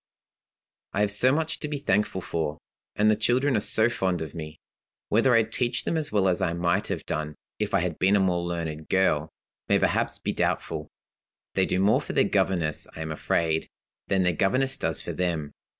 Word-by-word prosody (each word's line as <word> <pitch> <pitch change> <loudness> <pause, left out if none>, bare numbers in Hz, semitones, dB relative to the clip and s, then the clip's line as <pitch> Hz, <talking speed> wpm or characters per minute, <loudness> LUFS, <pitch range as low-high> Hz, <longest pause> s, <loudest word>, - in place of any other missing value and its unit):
"I 100 - +1
have 105 -1 +3
so 125 +6 +3
much 160 +3 -1
to 150 - -4
be 150 -1 -3
thankful 105 -8 0
for, 80 -3 -2 0.4
and 110 +1 +4
the - - +3
children 125 +5 +2
are - - +3
so 110 +2 +3
fond 95 -7 -1
of 80 - -8
me. 75 -2 -7 0.5
Whether 115 +4 +4
I 115 - +5
teach 120 +2 -2
them - - -1
as 155 -2 -2
well 100 -2 +2
as 90 0 +1
I 90 -3 +1
might 85 +4 0
have - - -4
done, 75 -1 -3 0.2
if 105 -2 0
I 95 - +3
had 85 -2 -3
been 95 +2 +4
a - - +4
more 90 -2 +2
learned 80 -3 -4
girl, 80 -5 +2 0.4
may - - +5
perhaps - - +1
be - - -2
doubtful. 75 -1 -1 0.7
They - - +2
do 90 - 0
more 100 +3 +4
for - - -6
their - - +4
governess, 85 -5 0
I 80 - -6
am 80 0 -4
afraid, 80 +1 0 0.4
than 95 -1 +2
their 90 -1 +2
governess 130 +10 +1
does 80 -1 -2
for - - -4
them. 85 -5 -2
95 Hz, 205 wpm, -26 LUFS, 80-110 Hz, 0.7 s, I